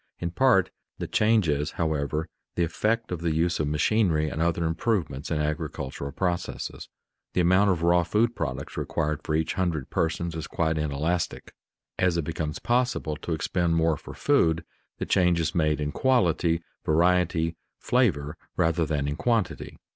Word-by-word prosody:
In 85 -1 -3
part 95 -2 +3 0.3
the - - -4
change 110 -3 +3
is, 75 0 0
however, 80 -1 -1 0.3
the 85 - +2
effect 110 +7 0
of 90 -2 -3
the 85 -2 0
use 85 +2 +1
of 75 - 0
machinery 80 0 +2
and 80 - -3
other 85 0 +1
improvements 80 - -1
in 80 - 0
agricultural 70 -2 -3
processes. 90 +2 -3 0.4
The 90 - +2
amount 95 +4 +4
of 85 -3 0
raw 85 +1 +5
food 110 +7 +1
products - - -4
required 75 -1 -1
for 75 0 -2
each 80 0 0
hundred 85 -7 -2
persons 85 +1 -1
is 80 -1 -5
quite 80 -1 0
inelastic. 75 +4 -2 0.5
As 90 -2 +2
it 85 - 0
becomes 80 -1 -3
possible 120 -10 0
to 85 - -4
expend 85 +1 0
more 80 -1 +3
for - - -10
food, 80 0 +2 0.3
the - - -3
change 90 -2 +3
is 80 -1 0
made 75 -3 +1
in 75 0 -2
quality, 85 - +2 0.2
variety, 85 0 +2 0.2
flavor, 85 - +1 0.2
rather 80 0 +2
than 70 -2 -1
in 75 +1 -2
quantity. 115 -6 -1
85 Hz, 160 wpm, -26 LUFS, 75-90 Hz, 0.5 s, raw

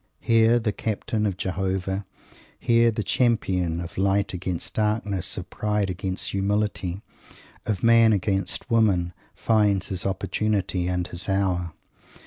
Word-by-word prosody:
Here 115 +1 +4
the 110 -2 0
Captain 105 +1 -2
of 95 -3 -3
Jehovah, 95 +1 -2 0.5
here 115 0 +3
the 110 -1 -2
champion 95 -8 +1
of 85 +1 -6
Light 100 +1 +1
against 90 -1 -4
Darkness, 105 -3 -1
of - - -7
Pride 105 -2 -1
against 95 +1 -3
Humility, 100 -1 -1 0.6
of 105 -5 -2
Man 115 -1 +6
against 100 -1 0
Woman, 95 -6 +2 0.2
finds 105 -4 +2
his 95 -2 -3
opportunity 95 -1 -1
and 90 -1 -1
his 90 +3 -7
hour. 90 -4 0
100 Hz, 125 wpm, -25 LUFS, 95-110 Hz, 0.6 s, Man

